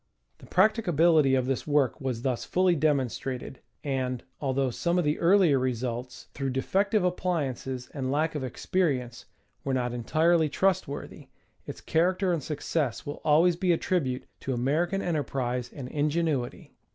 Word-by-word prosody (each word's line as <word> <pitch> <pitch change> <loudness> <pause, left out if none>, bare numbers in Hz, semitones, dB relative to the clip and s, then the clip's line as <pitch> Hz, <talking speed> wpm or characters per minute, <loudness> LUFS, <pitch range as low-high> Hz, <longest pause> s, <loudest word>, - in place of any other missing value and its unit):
The - - -14
practicability 170 - +4
of 130 -1 +1
this 135 +2 -2
work 145 -1 +1
was 125 -3 -3
thus 130 -3 -1
fully 185 -1 +2
demonstrated, 135 -4 -1 0.2
and, 130 -3 -2 0.2
although 135 -2 0
some 170 +8 0
of 180 - +2
the 150 +1 0
earlier 170 -5 +4
results, 125 0 -3
through 135 -1 -2
defective 195 - +1
appliances 145 -8 -2
and 130 -3 -2
lack 155 +3 +1
of 150 -3 -3
experience, 130 -3 -1 0.4
were 135 -1 -1
not 125 -1 -1
entirely 160 +6 +2
ti'ustworthy, 180 -3 -1 0.4
its - - -7
character 180 +3 +1
and 165 - -1
success 140 -4 -2
will 145 - -6
always 165 +4 +4
be 180 0 +2
a - - +1
tribute 135 -10 -1
to 130 - -3
American 165 +10 0
enterprise 125 -7 -2
and 135 -4 -7
ingenuity. 150 -3 -1
145 Hz, 145 wpm, -27 LUFS, 130-170 Hz, 0.4 s, practicability